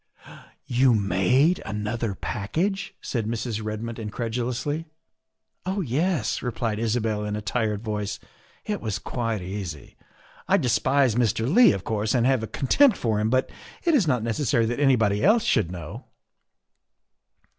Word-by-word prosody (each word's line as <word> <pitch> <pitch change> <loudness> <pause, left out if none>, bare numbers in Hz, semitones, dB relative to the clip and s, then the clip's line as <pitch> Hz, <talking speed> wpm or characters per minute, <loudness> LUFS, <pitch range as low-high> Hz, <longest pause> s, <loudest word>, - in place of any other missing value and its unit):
" - - -20 0.2
You 125 0 +3
made 105 - +2
another 105 +1 -3
package?" 185 - -2
said 115 -4 -2
Mrs. 115 -1 -3
Red 110 +1 -4
mood 115 0 -5
incredulously. 120 +7 -3 0.4
" 130 - -51
Oh, 195 +2 -1
yes," 150 - 0
replied 115 -3 -2
Isabel 110 -2 0
in 105 0 -3
a 105 - -4
tired 110 -1 -1
voice, 105 -2 -3 0.2
" - - -32
it 210 -1 -3
was 105 -4 -2
quite 115 -1 -3
easy. 90 -5 -6 0.5
I - - +4
despise 130 +1 +2
Mr. 115 -1 +1
Leigh, 215 - +6
of 95 - -4
course, 110 +1 -1
and 120 -1 +2
have 130 -2 +3
a 110 - -4
contempt 245 - +3
for 110 -3 0
him, 105 +1 +1
but 130 +2 +1 0.3
it 340 - +2
is 230 - +3
not 125 -6 +1
necessary 115 +1 +1
that 120 +4 -2
anybody 115 -8 +3
else 220 +3 +5
should 110 - +1
know." 85 -4 -8
115 Hz, 155 wpm, -25 LUFS, 105-135 Hz, 0.5 s, Leigh